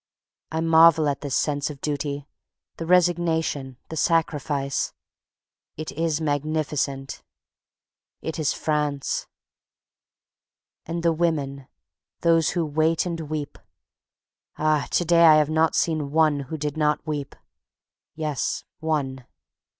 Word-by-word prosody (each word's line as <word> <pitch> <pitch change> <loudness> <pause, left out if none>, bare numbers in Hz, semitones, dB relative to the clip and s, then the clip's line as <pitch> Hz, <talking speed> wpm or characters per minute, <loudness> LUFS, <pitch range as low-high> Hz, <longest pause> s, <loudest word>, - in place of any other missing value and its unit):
I 160 0 -1
marvel 165 -1 +6
at 140 -1 -1
the 145 - -4
sense 145 +2 0
of 145 -2 -8
duty, 145 -1 -3 0.5
the 165 - -5
resignation, 165 -6 +1
the 160 - -5
sacrifice. 150 -4 0 0.8
It 155 0 -5
is 160 0 -1
magnificent, 145 -2 -2 1.0
it 160 0 -5
is 155 - +1
FRANCE. 150 -3 -1 1.6
And 170 +1 -3
the 170 -1 +3
Women. 145 -5 -1 0.5
Those 165 -2 +4
who 170 - +1
wait 155 +3 +1
and 170 -2 -3
weep. 150 -2 -4 1.0
Ah! 155 -1 +1
to 175 - +1
day 170 0 +5
I 160 -2 +9
have 155 0 +3
not 160 +1 +2
seen 155 -4 0
one 155 -1 +3
who 160 - -3
did 150 0 -3
not 150 -1 +1
weep. 145 -3 -4 0.8
Yes, 150 -5 -2 0.2
one. 140 -5 -2
155 Hz, 120 wpm, -24 LUFS, 145-160 Hz, 1.6 s, I